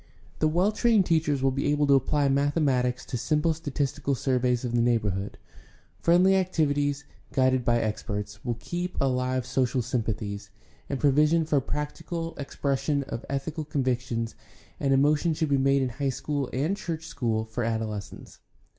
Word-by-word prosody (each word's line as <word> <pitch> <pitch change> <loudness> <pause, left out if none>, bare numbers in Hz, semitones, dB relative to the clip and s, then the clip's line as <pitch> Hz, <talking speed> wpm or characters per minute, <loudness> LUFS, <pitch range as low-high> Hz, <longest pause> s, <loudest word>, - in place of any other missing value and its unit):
The 155 - +3
well 175 +6 +2
trained 220 -3 +3
teachers 155 -5 +1
will 135 - +3
be 135 +2 -1
able 145 0 +2
to 140 - +4
apply 140 +2 +2
mathematics 135 -3 +1
to 125 - -3
simple 155 +6 +1
statistical 140 -2 -2
surveys 125 -1 0
of 120 - -3
the 120 - +3
neighborhood; 105 -5 0 0.6
friendly 180 +3 +4
activities, 145 -6 +1 0.3
guided 130 -1 +2
by 120 0 +2
experts, 105 -2 -4
will 120 -2 -1
keep 175 +7 -4
alive 130 -1 0
social 130 -1 0
sympathies; 105 -4 -3 0.4
and 140 - -2
provision 150 +3 +3
for 150 -3 +2
practical 155 +4 -4
expression 140 0 -1
of 130 -3 -6
ethical 150 +3 -3
convictions 125 -5 -1 0.5
and 140 - +1
emotion 150 +4 +3
should 160 -1 -1
be 140 - +3
made 135 0 +3
in 130 - -1
high 135 +3 -2
school 140 +1 -2
and 155 +10 0
church 165 -5 -4
school 110 -3 -1
for 110 +2 -4
adoles 110 -3 -2
cents. - - -13
135 Hz, 155 wpm, -27 LUFS, 125-150 Hz, 0.6 s, to